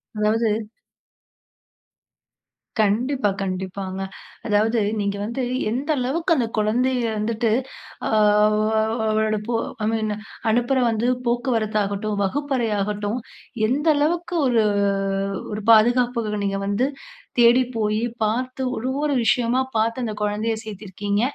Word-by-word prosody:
அதாவது 215 Hz, +2 st, +2 dB, 2.3 s
கண்டிப்பா 235 Hz, +3 st, +1 dB
கண்டிப்பாங்க 190 Hz, 0 st, -4 dB, 0.5 s
அதாவது 220 Hz, +2 st, +2 dB, 0.2 s
நீங்க 200 Hz, 0 st, -1 dB
வந்து 235 Hz, +4 st, -3 dB, 0.3 s
எந்த 270 Hz, +6 st, -3 dB
அளவுக்கு 320 Hz, +7 st, +1 dB
அந்த 235 Hz, -3 st, +1 dB
குழந்தையை 245 Hz, +4 st, +1 dB
வந்துட்டு, 220 Hz, +1 st, 0 dB, 0.6 s
அ -, -, -2 dB, 0.4 s
வ் 220 Hz, +1 st, +1 dB
அவளோட 215 Hz, 0 st, +1 dB, 0.5 s
ஐ -, -, +1 dB
மீன் 220 Hz, -1 st, -1 dB, 0.4 s
அனுப்பற 240 Hz, +4 st, +2 dB
வந்து 225 Hz, +2 st, 0 dB, 0.2 s
போக்குவரத்தாகட்டும் 215 Hz, -4 st, 0 dB
வகுப்பறை 265 Hz, +1 st, -1 dB
ஆகட்டும். 210 Hz, +3 st, -2 dB, 0.5 s
எந்த 290 Hz, +7 st, 0 dB
அளவுக்கு 345 Hz, +4 st, 0 dB
ஒரு 235 Hz, -3 st, +3 dB, 0.9 s
ஒரு 210 Hz, -, -3 dB
பாதுகாப்புக்கு 235 Hz, -1 st, +3 dB
நீங்க 195 Hz, 0 st, -1 dB
வந்து 205 Hz, +7 st, +1 dB, 0.5 s
தேடி 240 Hz, +2 st, +6 dB
போய் 215 Hz, -1 st, 0 dB, 0.2 s
பார்த்து 255 Hz, +4 st, -1 dB
ஒவ்வொரு 275 Hz, +5 st, -1 dB
விஷயமா 240 Hz, +3 st, +2 dB, 0.2 s
பார்த்து, 230 Hz, +3 st, +1 dB
அந்த 220 Hz, -2 st, -2 dB
குழந்தையை 210 Hz, +2 st, 0 dB
சேர்த்திருக்கீங்க. 205 Hz, 0 st, -3 dB
225 Hz, 105 wpm, -22 LUFS, 210-250 Hz, 2.3 s, தேடி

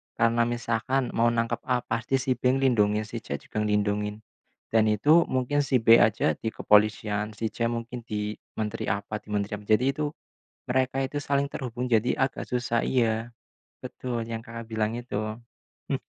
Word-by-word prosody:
Karena 115 Hz, 0 st, +3 dB
misalkan 120 Hz, +2 st, -1 dB
mau 115 Hz, +1 st, +2 dB
nangkep 115 Hz, 0 st, 0 dB
A, 125 Hz, -1 st, +1 dB
pasti 115 Hz, +4 st, -1 dB
si 135 Hz, 0 st, 0 dB
B -, -, +1 dB
lindungin. 110 Hz, -6 st, +2 dB
Si 115 Hz, +2 st, -6 dB
C 70 Hz, -, -5 dB
juga 70 Hz, -, -6 dB
lindungin. 105 Hz, 0 st, 0 dB, 0.5 s
Dan 110 Hz, -1 st, +4 dB
itu 145 Hz, +11 st, +4 dB
mungkin 130 Hz, +3 st, 0 dB
si 135 Hz, -4 st, +1 dB
B 115 Hz, +1 st, +8 dB
aja 110 Hz, 0 st, +3 dB
di -, -, -4 dB
kepolisian, 105 Hz, 0 st, +2 dB
si 110 Hz, +2 st, -2 dB
C 115 Hz, -1 st, -1 dB
mungkin 120 Hz, +1 st, -4 dB
di 105 Hz, -2 st, -3 dB, 0.2 s
menteri 110 Hz, +1 st, -3 dB
apa 105 Hz, 0 st, -2 dB
di -, -, -32 dB
menteri 105 Hz, 0 st, -1 dB
apa. 105 Hz, -, -15 dB
Jadi 110 Hz, +3 st, +4 dB
itu 150 Hz, +2 st, -2 dB, 0.6 s
mereka 130 Hz, +1 st, +1 dB
itu 135 Hz, +2 st, -5 dB
saling 140 Hz, 0 st, +1 dB
terhubung. 125 Hz, -3 st, -4 dB
Jadi 120 Hz, +1 st, +3 dB
agak 135 Hz, 0 st, 0 dB
susah 120 Hz, -1 st, 0 dB
iya. 115 Hz, -2 st, 0 dB, 0.5 s
Betul, 120 Hz, -3 st, -4 dB
yang, 115 Hz, 0 st, -5 dB
Kakak, 115 Hz, -1 st, -8 dB
bilang 110 Hz, +1 st, -1 dB
itu. 110 Hz, -3 st, -4 dB, 0.5 s
Hmm. -, -, 0 dB
115 Hz, 170 wpm, -27 LUFS, 105-125 Hz, 0.6 s, B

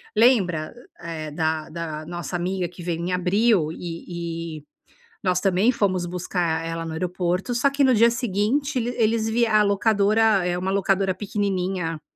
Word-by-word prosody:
lembra, 195 Hz, -9 st, +3 dB, 0.3 s
eh, 160 Hz, -3 st, -5 dB
da 160 Hz, 0 st, -1 dB
da 155 Hz, -2 st, -5 dB
nossa 175 Hz, +1 st, -5 dB
amiga 180 Hz, 0 st, -2 dB
que 175 Hz, +1 st, -12 dB
veio 170 Hz, -1 st, -2 dB
em 180 Hz, +1 st, -2 dB
abril 180 Hz, -2 st, +2 dB
e 170 Hz, -1 st, -6 dB
e -, -, -29 dB, 0.6 s
nós 180 Hz, -1 st, +2 dB
também 195 Hz, +4 st, +3 dB
fomos 185 Hz, -6 st, 0 dB
buscar 170 Hz, -2 st, -2 dB
ela 165 Hz, 0 st, -4 dB
no 160 Hz, -, -5 dB
aeroporto 180 Hz, +6 st, -1 dB
só 255 Hz, +4 st, +3 dB
que 280 Hz, 0 st, +2 dB
no 260 Hz, -, +5 dB
dia 230 Hz, +1 st, +5 dB
seguinte 240 Hz, +5 st, 0 dB
ele 240 Hz, +1 st, -2 dB
eles 225 Hz, 0 st, +2 dB
vi 235 Hz, +2 st, +2 dB
a 215 Hz, -1 st, +4 dB
locadora 205 Hz, -1 st, +3 dB
é 175 Hz, 0 st, 0 dB
uma 190 Hz, +1 st, -2 dB
locadora 195 Hz, -1 st, +1 dB
pequenininha, 185 Hz, -4 st, -2 dB
185 Hz, 165 wpm, -23 LUFS, 170-215 Hz, 0.6 s, no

